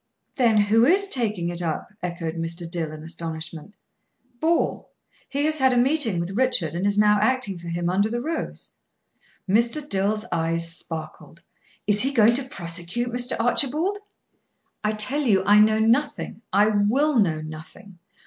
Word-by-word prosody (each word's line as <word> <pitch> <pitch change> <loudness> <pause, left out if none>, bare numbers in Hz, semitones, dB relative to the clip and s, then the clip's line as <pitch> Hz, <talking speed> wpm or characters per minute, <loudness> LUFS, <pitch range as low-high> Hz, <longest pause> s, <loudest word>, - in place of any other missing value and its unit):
"Then 235 -4 +3
who 210 +2 +4
is 380 +9 +4
taking 210 - -1
it 175 0 -3
up?" 165 +4 -4
echoed 170 -2 -4
Mr. 165 +1 -4
Dill, 165 -2 -2
in 155 0 -9
astonishment. 165 +2 -6 0.6
"Ball. 330 +1 0 0.4
He 285 +1 -1
has 310 0 0
had 260 -1 +4
a - - +1
meeting 245 - +2
with 170 +2 -3
Richard, 215 -8 +1
and 180 +4 -1
is 205 0 0
now 210 0 +4
acting 215 -5 0
for 170 - -10
him 170 +1 -2
under 195 +4 +1
the 240 +2 -2
rose." 320 +6 -5 0.7
Mr. 235 +9 +1
Dill's 210 0 0
eyes 165 0 -1
sparkled. 160 0 -8 0.4
"Is 205 0 +3
he 270 - +2
going 230 -3 +5
to 265 +2 -1
prosecute, 175 +7 -4
Mr. 245 0 +1
Archibald?" 295 - +1 0.8
"I 215 0 0
tell 255 +8 0
you 205 -9 +2
I 205 +1 +6
know 215 +1 +4
nothing 230 +1 0
I 210 +1 +4
will 235 +7 +2
know 160 -6 +1
nothing. 165 +5 -11
210 Hz, 160 wpm, -24 LUFS, 170-250 Hz, 0.8 s, I